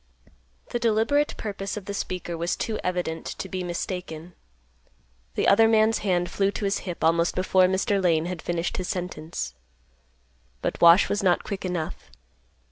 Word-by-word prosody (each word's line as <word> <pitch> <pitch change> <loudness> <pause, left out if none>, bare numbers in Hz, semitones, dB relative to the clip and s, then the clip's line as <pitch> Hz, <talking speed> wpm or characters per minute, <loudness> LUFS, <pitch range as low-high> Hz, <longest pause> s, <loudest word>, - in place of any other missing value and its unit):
The 240 - -1
deliberate 235 +6 +2
purpose 200 -1 -4
of 205 - -7
the 200 - -4
speaker 180 -3 -4
was 170 +1 -1
too 220 - -3
evident 180 -3 -2
to - - -5
be 185 -1 -4
mistaken. 175 -1 -5 1.0
The - - +1
other 225 +3 +6
man's 220 0 +3
hand 180 -3 0
flew 195 -1 +1
to 205 - -3
his 195 - 0
hip 170 - -5
almost 170 +1 +3
before 185 0 +4
Mr. 190 +2 +1
Lane 165 -2 +3
had 175 -2 -4
finished 170 0 -2
his 185 - -3
sentence. 160 - -4 1.1
But - - -2
Wash 170 +3 +8
was 205 - -1
not 180 -3 +2
quick 200 -2 -5
enough. 175 -3 -4
185 Hz, 160 wpm, -25 LUFS, 170-200 Hz, 1.1 s, Wash